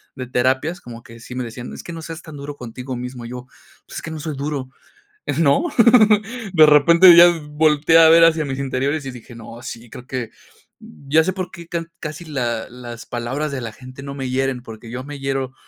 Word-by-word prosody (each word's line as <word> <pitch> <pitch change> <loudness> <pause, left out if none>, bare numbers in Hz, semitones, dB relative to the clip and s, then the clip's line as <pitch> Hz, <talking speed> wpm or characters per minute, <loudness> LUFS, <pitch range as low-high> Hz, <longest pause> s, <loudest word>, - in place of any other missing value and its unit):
de 130 -1 -6
terapias, 130 +7 0
como 120 -1 -10
que 115 0 -14
sí 120 +2 -10
me 125 - -2
decía: 120 +1 -8
"Es - - -8
que 170 - -8
no 165 - -7
seas 165 0 -8
tan 155 -3 -11
duro 140 +1 -7
contigo 125 0 -7
mismo". 125 0 -7
Y - - -8
yo, 125 0 -8 0.4
pues - - -7
que 160 - -6
no 160 - -6
soy 150 -1 -5
duro, 140 -2 -4 0.7
¿no? 165 - +3 0.9
De 160 -3 +7
repente 170 +4 +7
ya 170 +1 +9 0.2
volteé 155 +1 +4
a 160 -1 +8
ver 165 0 +7
hacia 165 -1 +3
mis 135 -2 -4
interiores 140 +2 -2
y 135 - -5
dije: 120 -1 -12
"No, 115 +1 -11
sí, 115 -2 -9
creo 125 - -11
que, 125 -4 -4 0.5
ya 140 - 0
sé 185 - -1
por 185 -2 -5
qué 170 -2 -11
ca 170 -1 -3
casi 155 +2 -7
la 120 -7 -3
las 120 -1 -10
palabras 130 +6 -3
de 135 -2 -4
la 115 -2 -5
gente 130 +3 -12
no 140 0 -7
me 135 -2 -4
hieren", 130 -1 -1
porque 115 -1 -11
yo 130 +1 -5
me 145 +1 -8
hiero 135 -1 -3
135 Hz, 220 wpm, -20 LUFS, 125-155 Hz, 0.9 s, ya